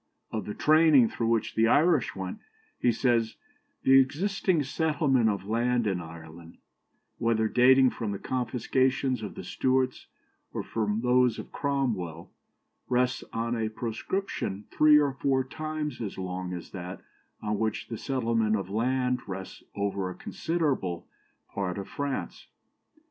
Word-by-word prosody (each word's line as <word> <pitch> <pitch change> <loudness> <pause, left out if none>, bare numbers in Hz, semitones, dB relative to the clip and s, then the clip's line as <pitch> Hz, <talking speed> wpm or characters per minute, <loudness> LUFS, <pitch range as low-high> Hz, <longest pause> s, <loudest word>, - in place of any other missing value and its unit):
" - - -46
Of 110 -4 -2
the 105 - -5
"training" 155 -6 +5
through 115 - -2
which 115 -1 +1
the 115 +1 +3
Irish 150 0 +3
went, 95 -1 -5 0.4
he 120 - +3
says 115 -1 +1 0.5
"The 135 0 +7
existing 170 +4 +1
settlement 140 -5 +2
of 100 -2 -2
land 120 +2 +1
in 95 -4 0
Ireland, 80 0 -11 0.6
whether 115 -1 +2
dating 130 +3 +5
from 110 -4 -4
the 100 - -3
confiscations 130 +2 0
of 105 - -6
the - - -7
Stuarts, 130 +6 0 0.5
or - - -3
from 110 -1 -1
those 125 0 +3
of - - -8
Cromwell, 110 - -2 0.6
rests 125 0 +1
on 115 +1 -1
a 110 -1 -1
proscription 115 - -3
three 150 0 +6
or 145 -2 +2
four 135 0 +1
times 155 -1 -4
as 105 -4 -5
long 90 -1 -4
as 90 -2 -7
that 90 -1 -7 0.4
on 105 -1 -1
which 110 -1 -1
the 115 - -5
settlement 115 -5 +1
of 95 -2 -4
land 125 +3 +1
rests 95 -1 -7
over 100 -2 -1
a 90 - -7
considerable 140 - -2 0.5
part 95 -2 -2
of 100 - -5
France. 140 -1 -4
115 Hz, 145 wpm, -28 LUFS, 100-135 Hz, 0.6 s, The